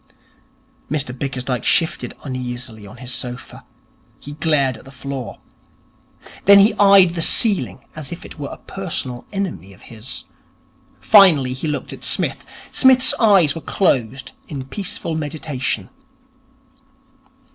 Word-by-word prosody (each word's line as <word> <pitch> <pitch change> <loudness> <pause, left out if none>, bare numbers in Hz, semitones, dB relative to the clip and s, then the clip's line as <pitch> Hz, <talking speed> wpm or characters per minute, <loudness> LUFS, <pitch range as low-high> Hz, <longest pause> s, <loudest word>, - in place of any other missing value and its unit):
Mr 135 -4 -2
Bickersdyke 125 -2 -4
shifted 165 0 0
uneasily 125 -5 -6
on 110 - -13
his 125 0 -8
sofa. 125 -1 -7 0.6
He 145 - -10
glared 145 -4 +1
at - - -14
the 135 - -13
floor. 135 -1 -7 1.1
Then 200 +1 +8
he 205 +2 +5
eyed 195 -3 +6
the 170 -1 -3
ceiling 165 - +4
as 155 -4 -7
if 170 - -8
it - - -12
were 140 - -5
a - - -9
personal 145 -10 -5
enemy 190 - -5
of - - -19
his. 115 +3 -5 0.8
Finally 165 -12 +5
he 130 +5 -5
looked 150 - -4
at - - -12
Psmith. - - 0 0.3
Psmith's 260 +1 +5
eyes 195 - +4
were 165 - -7
closed 130 - -1 0.2
in 135 -4 -6
peaceful 175 0 -5
meditation. 150 -3 -4
140 Hz, 130 wpm, -19 LUFS, 125-180 Hz, 1.1 s, Then